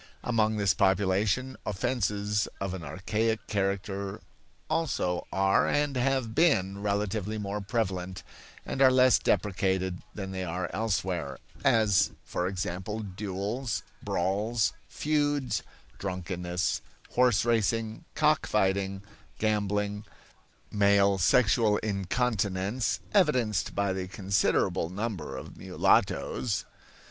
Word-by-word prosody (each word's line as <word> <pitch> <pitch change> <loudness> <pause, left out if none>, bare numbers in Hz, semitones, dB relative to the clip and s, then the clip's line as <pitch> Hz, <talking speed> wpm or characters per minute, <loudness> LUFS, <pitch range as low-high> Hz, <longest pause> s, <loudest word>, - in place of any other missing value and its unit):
Among 110 -3 +1
this 100 -2 +3
population 100 +6 +1
offenses 105 -1 0
of 95 -1 -3
an 95 - -5
archaic 105 +7 -1
character 100 -1 -2 0.5
also 125 - -1
are 95 +1 +3
and 145 -1 +1
have 130 -2 0
been 100 - +2
relatively 105 +1 -1
more 105 0 -3
prevalent 95 -4 -2 0.4
and 135 - -3
are 135 - +8
less 130 -2 +5
deprecated 95 -2 0
than 95 -2 -5
they 95 -1 -3
are 90 0 -3
elsewhere; 95 -8 -1 0.3
as, 105 -6 +4
for 90 - -2
example, 95 +3 -3
duels, 105 +4 -3 0.2
brawls, 105 +4 0 0.2
feuds, 145 -3 0 0.4
drunkenness, 90 -1 -2 0.3
horse 120 -4 +3
racing, 115 - 0
cock 155 -2 +3
fighting, 95 -1 0 0.3
gambling, 105 -1 0 0.7
male 100 -1 +4
sexual 105 +2 +4
incontinence 100 +1 -1
(evidenced 125 - +2
by 100 -1 +1
the 95 -1 -3
considerable 95 -3 +1
number 95 - -4
of - - -9
mulattoes). 110 -6 +1
100 Hz, 100 wpm, -29 LUFS, 95-115 Hz, 0.7 s, are